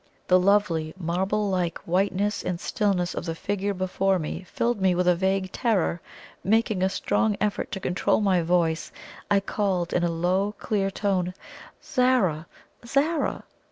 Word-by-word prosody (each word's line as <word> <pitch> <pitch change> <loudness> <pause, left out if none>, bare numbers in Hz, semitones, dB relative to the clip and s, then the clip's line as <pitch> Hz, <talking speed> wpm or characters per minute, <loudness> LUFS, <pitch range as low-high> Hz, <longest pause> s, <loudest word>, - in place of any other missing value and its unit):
The 185 0 +5
lovely, 180 -5 +2
marble 190 +4 -1
like 180 -3 -1
whiteness 195 +3 0
and 180 -2 -2
stillness 190 -4 0
of - - -4
the 165 -1 -3
figure 200 +3 -2
before 185 +1 +1
me 155 +1 -4
filled 235 -3 -1
me 185 -1 +3
with 180 0 +1
a 180 - +6
vague 190 +1 0
terror. 195 -8 0 0.4
Making 215 -1 +2
a 190 - +3
strong 210 +2 0
effort 210 -1 -1
to 195 - -3
control 180 -1 +1
my 190 -4 +2
voice, 165 -1 0 0.4
I 200 -1 +4
called, 195 -3 -1
in 175 - +1
a 175 - +2
low, 185 +5 0
clear 195 -2 -1
tone: 185 -2 -1 0.5
"Zara! 225 - +1 0.4
Zara!" 290 +7 0
190 Hz, 155 wpm, -25 LUFS, 175-205 Hz, 0.5 s, a